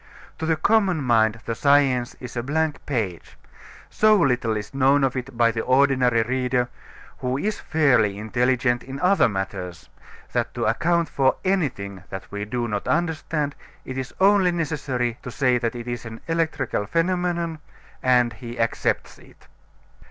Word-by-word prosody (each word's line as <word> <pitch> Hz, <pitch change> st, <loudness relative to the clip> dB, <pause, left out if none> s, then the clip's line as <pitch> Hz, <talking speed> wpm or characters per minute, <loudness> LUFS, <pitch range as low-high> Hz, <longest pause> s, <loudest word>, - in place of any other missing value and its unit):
To 160 Hz, -, -2 dB
the 160 Hz, -, +3 dB
common 195 Hz, -4 st, +2 dB
mind 115 Hz, -2 st, +2 dB
the 115 Hz, -, -2 dB
science 135 Hz, -2 st, +2 dB
is 125 Hz, -1 st, -9 dB
a 120 Hz, -, -1 dB
blank 155 Hz, +4 st, -1 dB
page. 105 Hz, -, -3 dB, 0.5 s
So 215 Hz, 0 st, +4 dB
little 125 Hz, -, +1 dB
is 105 Hz, -, -7 dB
known 135 Hz, +1 st, +3 dB
of 135 Hz, -1 st, +1 dB
it 130 Hz, -1 st, -5 dB
by 115 Hz, -1 st, +4 dB
the 115 Hz, 0 st, -2 dB
ordinary 130 Hz, -3 st, +3 dB
reader, 125 Hz, 0 st, 0 dB, 0.5 s
who 125 Hz, +1 st, -1 dB
is 210 Hz, +8 st, -2 dB
fairly 125 Hz, -10 st, +2 dB
intelligent 120 Hz, +3 st, +1 dB
in 135 Hz, +2 st, -8 dB
other 185 Hz, -5 st, +4 dB
matters, 95 Hz, -4 st, -5 dB, 0.4 s
that -, -, -1 dB
to -, -, -1 dB
account 170 Hz, -1 st, +1 dB
for 135 Hz, -2 st, +2 dB
anything 125 Hz, -, -1 dB
that 95 Hz, -, -6 dB
we 100 Hz, 0 st, -4 dB
do 120 Hz, +2 st, -2 dB
not 105 Hz, -2 st, -3 dB
understand 155 Hz, -3 st, -1 dB, 0.3 s
it 130 Hz, -, -6 dB
is 130 Hz, -1 st, -4 dB
only 195 Hz, -1 st, +5 dB
necessary 140 Hz, -8 st, -2 dB
to -, -, -7 dB
say 125 Hz, -1 st, +1 dB
that 115 Hz, 0 st, -2 dB
it 120 Hz, 0 st, -7 dB
is 120 Hz, 0 st, -4 dB
an 115 Hz, 0 st, -8 dB
electrical 160 Hz, -10 st, -1 dB
phenomenon 170 Hz, -, 0 dB, 0.4 s
and 125 Hz, -2 st, +3 dB
he 120 Hz, +2 st, -9 dB
accepts 115 Hz, 0 st, -1 dB
it. -, -, -20 dB
130 Hz, 160 wpm, -23 LUFS, 115-155 Hz, 0.5 s, only